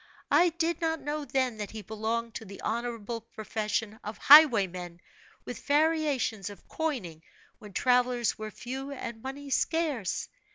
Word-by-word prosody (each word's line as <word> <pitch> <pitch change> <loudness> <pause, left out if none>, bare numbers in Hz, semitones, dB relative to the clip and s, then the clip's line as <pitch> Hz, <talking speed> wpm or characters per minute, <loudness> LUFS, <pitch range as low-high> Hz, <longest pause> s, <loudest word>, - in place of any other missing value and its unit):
I 350 +1 +6
did 335 0 -1
not 325 -1 0
know 295 +1 -3
then 260 -5 0
that 210 -1 -5
he 220 -1 -8
belonged 225 +2 -3
to - - -6
the 195 0 -10
honorable 230 0 -3
profession 220 -1 -3
of 210 0 -6
highwaymen, 195 - +6 0.5
with - - -7
variations 290 - +1
of 200 -3 -13
coining 240 - -3 0.4
when 210 -2 -12
travelers 245 0 +2
were 215 0 -6
few 265 +6 -6
and 235 -4 -6
money 275 +2 -7
scarce. 295 - 0
235 Hz, 140 wpm, -29 LUFS, 215-285 Hz, 0.5 s, I